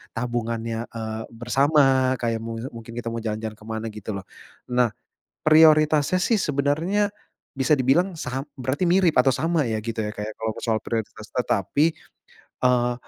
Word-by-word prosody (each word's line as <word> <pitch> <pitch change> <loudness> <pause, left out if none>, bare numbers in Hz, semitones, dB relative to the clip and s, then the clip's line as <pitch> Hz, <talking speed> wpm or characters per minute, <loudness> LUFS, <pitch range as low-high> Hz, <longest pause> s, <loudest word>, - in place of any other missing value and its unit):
tabungannya, 115 -1 -3
eee, 110 -1 -5
bersama 130 +2 +3
kayak 115 -2 -1
mu 115 0 -5 0.2
mungkin 115 0 -10
kita 115 -1 -4
mau 115 - -3
jalan-jalan 110 -1 -4
ke 105 - -15
mana 110 0 -4
gitu 105 0 -6
loh. 95 - -6 0.5
Nah, 125 -3 +2 0.5
prioritasnya 155 +2 +5
sih 225 -3 +2
sebenarnya 160 +8 +1 0.5
bisa 135 +3 +3
dibilang 150 +8 +2
sa 135 -3 -4
berarti 135 +7 -1
mirip 180 -1 +4
atau 130 +1 +4
sama 160 -5 +1
ya 110 -1 -2
gitu 115 0 -4
ya 105 - -4
kayak 105 +1 -4
kalau 110 -1 -2
soal 110 -2 +1
prioritas, 110 -1 -4
tetapi, 125 - +1 0.7
eee, 125 -1 +2
125 Hz, 150 wpm, -24 LUFS, 115-150 Hz, 0.7 s, prioritasnya